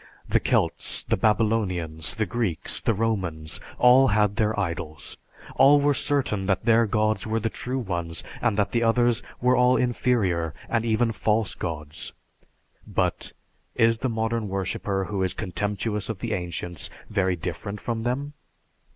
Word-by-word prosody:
The - - +3
Celts, - - 0
the - - +1
Babylonians, 95 -8 +1
the 110 - 0
Greeks, 105 -8 -1
the 115 - +1
Romans, 90 -8 -2 0.2
all 125 +2 +6
had 105 -2 +2
their 110 -1 +1
idols. 80 -5 -4 0.4
All 140 +2 +7
were 145 0 +3
certain 130 -10 0
that 95 -2 0
their 115 -1 +4
gods 110 +1 0
were 110 +1 0
the 115 0 -2
true 130 +2 -4
ones, 85 -8 -2 0.2
and 100 - +1
that 105 -1 +1
the 120 - +1
others 120 +1 +3 0.2
were 125 +1 +4
all 125 +1 +4
inferior 110 - +1
and 115 -1 0
even 115 +1 +2
false 110 -1 0
gods. 75 -3 -6 0.7
But, - - -1 0.4
is 115 0 +3
the 130 - -1
modern 110 -1 -1
worshipper 95 0 -2
who 100 -1 -3
is 95 -1 -1
contemptuous 105 +3 -2
of 110 - -3
the - - -3
ancients 90 -1 -4 0.2
very 95 -3 +1
different 90 +5 -5
from 115 +1 -3
them? 135 +5 -2
110 Hz, 150 wpm, -25 LUFS, 95-115 Hz, 0.7 s, All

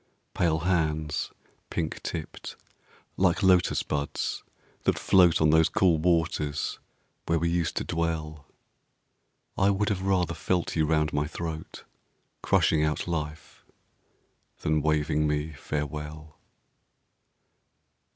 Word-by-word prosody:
Pale 80 -2 +1
hands, 80 -4 0 0.4
pink 80 -2 -3
tipped, 80 -2 -6 0.6
like 95 0 +2
Lotus 90 -2 +4
buds 70 -1 -2 0.4
that - - +2
float 90 -4 +5
On 75 -1 +4
those 80 0 +5
cool 85 -4 +3
waters 80 -3 0 0.5
where 85 - +2
we 85 +1 0
used 85 -1 -1
to - - 0
dwell, 80 -3 -3 1.1
I 95 - +4
would 100 +1 +1
have 100 -3 -1
rather 90 -3 +1
felt 85 +1 -1
you 80 -2 +2
round 75 -1 +1
my 75 0 0
throat, 80 0 -6 0.6
Crushing 75 -1 +3
out 75 +2 -1
life, 75 -2 -5 1.0
than 75 0 +1
waving 75 0 +1
me 75 +1 -1
farewell! 75 +1 -5
80 Hz, 110 wpm, -27 LUFS, 75-85 Hz, 1.1 s, float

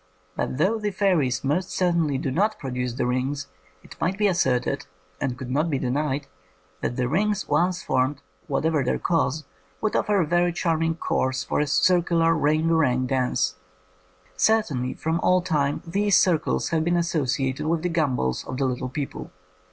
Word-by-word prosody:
But 130 - -2
though 200 +9 +2
the 210 -1 -1
fairies 180 -10 +1
most 160 +7 0
certainly 170 -6 +1
do 135 0 -2
not 210 +9 +1
produce 125 -2 -3
the 125 - -1
rings, 130 +3 -1 0.4
it - - -13
might 185 +3 0
be 210 - +1
asserted, 135 -8 +1 0.3
and 125 -2 -2
could 130 -1 -6
not 150 +5 +1
be 140 - 0
denied, 140 +2 -1 0.6
that 120 - -2
the 125 -1 0
rings 205 +7 0
once 180 0 +1
formed, 130 +2 0 0.3
what 145 +1 -1
ever 160 -4 +2
their 125 - 0
cause, 160 -3 0 0.4
would 215 - -1
offer 205 -1 +2
a 175 - +2
very 175 +2 +2
charm 165 -2 0
ing 165 0 +1
course 130 -5 -1
for - - -1
a 150 - +1
circular 165 +1 +3
ring 155 +1 +2
a - - +4
ring 130 -5 +2
dance. 125 -8 0 0.8
Certainly 145 - +1
from 160 +1 -1
all 185 +1 +3
time 145 -5 0
these 200 +3 +2
circles 170 -5 +1
have 160 -1 +1
been 175 +1 +1
associated 140 -5 -1
with 165 0 0
the 180 - 0
gambols 135 - 0
of 130 - -5
the 135 - +1
little 130 0 -2
people. 140 +1 -5
155 Hz, 180 wpm, -24 LUFS, 130-175 Hz, 0.8 s, a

